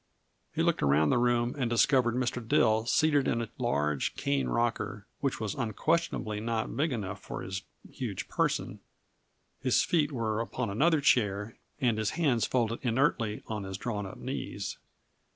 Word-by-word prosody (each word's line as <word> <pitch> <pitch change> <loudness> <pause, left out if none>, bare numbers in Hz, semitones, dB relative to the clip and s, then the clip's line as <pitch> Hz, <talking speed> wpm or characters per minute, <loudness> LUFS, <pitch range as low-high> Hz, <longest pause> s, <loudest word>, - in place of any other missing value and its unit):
He - - 0
looked - - +2
around 70 +2 +4
the - - +3
room 120 0 +2
and 130 -5 -1
discovered 120 0 +3
Mr. 125 -1 -1
Dill 110 0 +3
seated 145 0 +3
in 115 - +1
a 115 -2 -3
large, 75 0 0
cane 70 -2 0
rocker 115 - -1
which 135 -2 -1
was 110 -3 -2
unquestionably 120 -2 -1
not 110 0 -2
big 155 +2 +1
enough 105 -6 -4
for - - -6
his 95 +1 -4 0.3
huge - - -5
person - - -1 0.8
his 130 -2 +3
feet 155 -4 +2
upon 115 -1 -2
another 150 +8 +3
chair 105 -4 +2 0.2
and 120 -6 +2
his 110 -1 0
hands 135 -9 +2
folded 115 -2 0
inertly 115 -3 +1
on 105 -2 -4
his 95 0 -5
drawn 105 -2 -3
up 95 - -9
knees. 100 -7 -5
115 Hz, 155 wpm, -30 LUFS, 105-130 Hz, 0.8 s, around